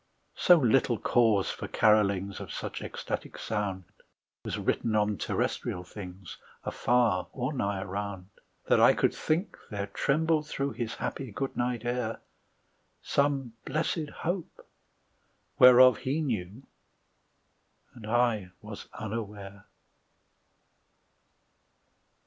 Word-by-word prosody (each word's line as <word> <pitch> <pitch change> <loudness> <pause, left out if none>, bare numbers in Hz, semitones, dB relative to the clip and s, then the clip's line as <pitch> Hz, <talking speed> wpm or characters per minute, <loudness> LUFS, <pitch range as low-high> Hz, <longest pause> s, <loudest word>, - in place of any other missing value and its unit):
So 180 - +6
little 125 -3 +3
cause 110 -5 +2
for - - -6
carolings 100 -3 +2
Of - - -7
such - - -5
ecstatic - - -5
sound 100 -3 -3 0.6
Was - - -3
written 115 -2 0
on 105 -1 +1
terrestrial 90 - -2
things 90 0 -10 0.2
Afar 120 -6 +1
or 130 +3 -2
nigh 100 -7 -1
around, 95 -1 -5 0.4
That - - +4
I - - +6
could - - +2
think 170 +6 -1
there 100 -2 -3
trembled 155 +9 +1
through 140 -1 -2
His 115 0 -4
happy 130 -5 -4
good 135 +6 -4
night 120 -1 -1
air 120 -2 -2 0.8
Some 140 -4 0
blessed 155 +1 -1
Hope, 175 +1 -3 0.9
whereof 125 -1 +8
he 135 +4 -1
knew, 110 - -3 1.3
And 115 -4 -11
I 115 -4 +1
was 105 -1 -9
unaware. 105 -3 -6
115 Hz, 110 wpm, -29 LUFS, 100-130 Hz, 1.3 s, whereof